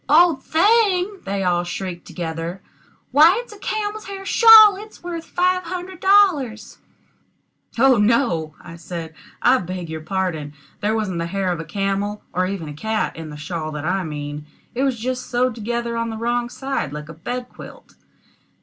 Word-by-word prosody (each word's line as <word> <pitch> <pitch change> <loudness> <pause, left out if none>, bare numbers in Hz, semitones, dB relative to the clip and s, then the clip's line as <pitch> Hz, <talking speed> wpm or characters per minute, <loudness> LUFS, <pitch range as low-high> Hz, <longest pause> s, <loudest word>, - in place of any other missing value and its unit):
"Old 320 -2 +5
thing!" 400 +2 +2
they 195 0 -2
all 175 -1 +1
shrieked 175 0 -6
together. 165 +2 -5 0.5
"Why, 320 - +6
it's 485 - -14
a 415 - -14
camel's 430 0 -3
hair 390 -1 -7
shawl; 435 -1 +8
it's 425 0 -12
worth 340 -2 -5
five 365 +1 +1
hundred 360 +1 -6
dollars." 365 - +2 1.0
"Oh 260 +1 +5
no!" 205 - +1
I 170 -1 -11
said. 165 -1 -7 0.3
"I 255 +1 +5
beg 180 -2 -6
your 160 0 -5
pardon; 160 -4 -3 0.3
there 215 +1 0
wasn't 195 -6 -2
the 170 - -2
hair 190 +1 -1
of 175 - -3
a 165 - -5
camel, 200 +4 -2
or 185 +1 +1
even 185 -5 -4
a 150 - -6
cat, 220 +8 -2
in 160 -1 -7
the 150 - -8
shawl 155 +1 -5
that 150 0 -5
I 185 +2 0
mean; 150 -1 -6 0.3
it 245 - -2
was 270 -3 +1
just 255 +2 -3
sewed 250 0 +1
together 235 +1 -3
on 230 0 -2
the 220 - -5
wrong 240 +1 -1
side 265 - -3
like 150 0 -7
a 165 - -9
bed 245 +10 -5
quilt." - - -13
220 Hz, 175 wpm, -21 LUFS, -, 1.0 s, shawl